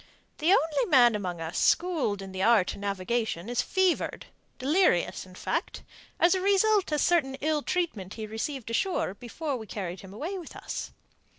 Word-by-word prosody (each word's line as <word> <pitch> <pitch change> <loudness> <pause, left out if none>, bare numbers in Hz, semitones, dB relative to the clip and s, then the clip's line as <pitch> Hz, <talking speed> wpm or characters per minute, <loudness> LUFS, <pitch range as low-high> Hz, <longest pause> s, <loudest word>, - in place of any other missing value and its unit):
The 325 +3 +3
only 355 +5 +3
man 250 -8 +6
among 185 -5 -3
us 165 +2 -3
schooled 300 - +1
in 190 - -8
the 190 0 -4
art 210 -3 +4
of - - -10
navigation 200 -1 -2
is 245 +1 0
fevered, 375 +2 0 0.3
delirious, 275 - +2
in 185 - -15
fact, - - -3 0.4
as 345 +2 +5
a 375 - 0
result 400 -1 +3
of 300 - +1
certain 295 -7 +2
ill 300 +2 0
treatment 255 - -2
he 220 - -5
received 230 +2 -4
ashore 360 - 0
before 265 +7 -4
we 220 -2 -9
carried 185 -3 -5
him 190 - -12
away 325 - -4
with 340 - -10
us. - - -5
245 Hz, 175 wpm, -28 LUFS, -, 0.4 s, man